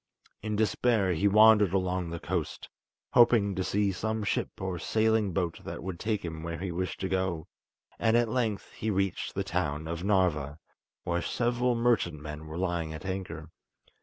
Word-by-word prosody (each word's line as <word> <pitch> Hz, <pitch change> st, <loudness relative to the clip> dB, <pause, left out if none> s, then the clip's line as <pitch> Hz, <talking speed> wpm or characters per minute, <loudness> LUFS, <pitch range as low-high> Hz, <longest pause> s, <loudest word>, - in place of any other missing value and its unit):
In 105 Hz, 0 st, -2 dB
despair, 110 Hz, -2 st, +2 dB
he 95 Hz, +5 st, +2 dB
wandered 105 Hz, -2 st, +6 dB
along 90 Hz, -2 st, 0 dB
the 85 Hz, 0 st, -5 dB
coast, 85 Hz, -3 st, -3 dB, 0.5 s
hoping 115 Hz, -4 st, +5 dB
to 95 Hz, -, -2 dB
see 100 Hz, +1 st, +1 dB
some 110 Hz, +3 st, -2 dB
ship -, -, 0 dB
or 95 Hz, -2 st, -3 dB
sailing 110 Hz, +1 st, +2 dB
boat 85 Hz, -2 st, -2 dB
that -, -, -6 dB
would 90 Hz, -2 st, -5 dB
take 110 Hz, -4 st, -1 dB
him 80 Hz, -1 st, -5 dB
where 85 Hz, 0 st, -4 dB
he 90 Hz, +2 st, -4 dB
wished 90 Hz, +2 st, -3 dB
to 95 Hz, -, 0 dB
go, 95 Hz, -4 st, -1 dB, 0.5 s
and 115 Hz, 0 st, +3 dB
at 120 Hz, -1 st, +3 dB
length 110 Hz, -4 st, -1 dB
he 110 Hz, -, -4 dB
reached 95 Hz, -2 st, -1 dB
the 100 Hz, -, 0 dB
town 80 Hz, -5 st, -2 dB
of 85 Hz, +1 st, -4 dB
Narva, 85 Hz, -8 st, +1 dB, 0.5 s
where 85 Hz, 0 st, -1 dB
several 120 Hz, +3 st, 0 dB
merchantmen 80 Hz, -10 st, 0 dB
were 80 Hz, +2 st, -6 dB
lying 85 Hz, -3 st, -1 dB
at 80 Hz, -, -9 dB
anchor. 95 Hz, -4 st, -5 dB
95 Hz, 170 wpm, -29 LUFS, 85-110 Hz, 0.5 s, wandered